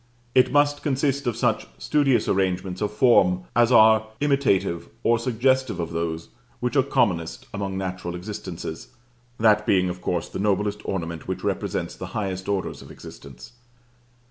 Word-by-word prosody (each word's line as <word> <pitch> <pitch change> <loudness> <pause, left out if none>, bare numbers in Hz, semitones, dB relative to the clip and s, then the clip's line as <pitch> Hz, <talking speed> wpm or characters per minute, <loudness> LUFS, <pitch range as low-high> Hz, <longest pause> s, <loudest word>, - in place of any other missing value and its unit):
It 130 - +4
must 145 +1 +3
consist 140 -1 0
of 115 -2 -1
such 120 -3 0
studious 135 -6 +2
arrangements 95 -1 -1
of 105 - 0
form 95 -6 +4
as 120 +1 +4
are 110 -2 +6
imitative 120 - +1
or 115 0 +3
suggestive 130 -2 +1
of 85 -1 -3
those 85 0 -3 0.3
which 125 +3 -2
are 135 - +6
commonest 110 -12 0
among 100 -2 -3
natural 90 -2 -4
existences, 90 -3 -7 0.5
that 105 -1 +4
being 90 -2 +3
of 90 0 -6
course 85 -2 -2
the - - -7
noblest 105 +1 0
ornament 85 -4 -4
which - - -4
represents - - -2
the - - -7
highest 95 -2 -3
orders 100 -2 -2
of - - -13
existence. 65 - -12
105 Hz, 150 wpm, -24 LUFS, 90-125 Hz, 0.5 s, are